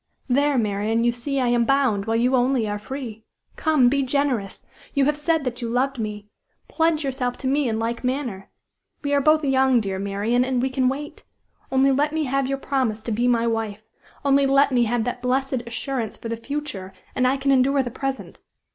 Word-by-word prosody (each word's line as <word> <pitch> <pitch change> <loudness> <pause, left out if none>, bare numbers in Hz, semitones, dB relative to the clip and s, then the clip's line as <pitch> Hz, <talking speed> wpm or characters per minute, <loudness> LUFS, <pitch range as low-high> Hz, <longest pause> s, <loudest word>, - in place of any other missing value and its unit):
There, 280 +2 +2
Marian, 215 +1 0
you 240 - +3
see 270 +4 -3
I 250 -2 +1
am 240 -1 +3
bound, 245 -6 +2
while 225 0 0
you 250 +3 +2
only 250 -2 +2
are 205 0 -3
free. 230 -2 -7 0.3
Come! 305 -6 +3
be 280 +3 +2
generous! 260 -6 -1 0.3
You 280 -1 +3
have 295 +1 +2
said 315 +1 0
that 250 -1 -4
you 235 - -3
loved 255 +2 0
me! 210 -1 -4 0.4
Pledge 320 -1 +1
yourself 255 -2 -2
to 265 - -4
me 275 -1 +1
in 220 - -1
like 230 +2 -3
manner. 250 -7 -3 0.5
We 285 0 -1
are 285 - +3
both 310 +1 +3
young, 265 -2 +3
dear 195 -3 -3
Marian, 205 +5 0
and 255 -1 0
we 260 +2 0
can 260 -1 +2
wait. 290 +3 -6 0.5
Only 265 +1 +4
let 295 +3 +1
me 315 0 0
have 275 -1 0
your 275 0 -1
promise 255 -6 -1
to 235 - -3
be 240 +3 +1
my 235 -1 +2
wife 220 -2 -2 0.4
only 275 0 +4
let 275 +1 +4
me 245 -2 +3
have 235 0 0
that 245 +1 -4
blessed 260 0 0
assurance 235 -1 -4
for 230 - -7
the 230 - -1
future, 230 -7 -5 0.2
and 255 - +2
I 265 +2 +2
can 275 +1 +1
endure 270 +1 +3
the 245 - -5
present. 270 +2 -5
255 Hz, 210 wpm, -23 LUFS, 230-275 Hz, 0.5 s, Only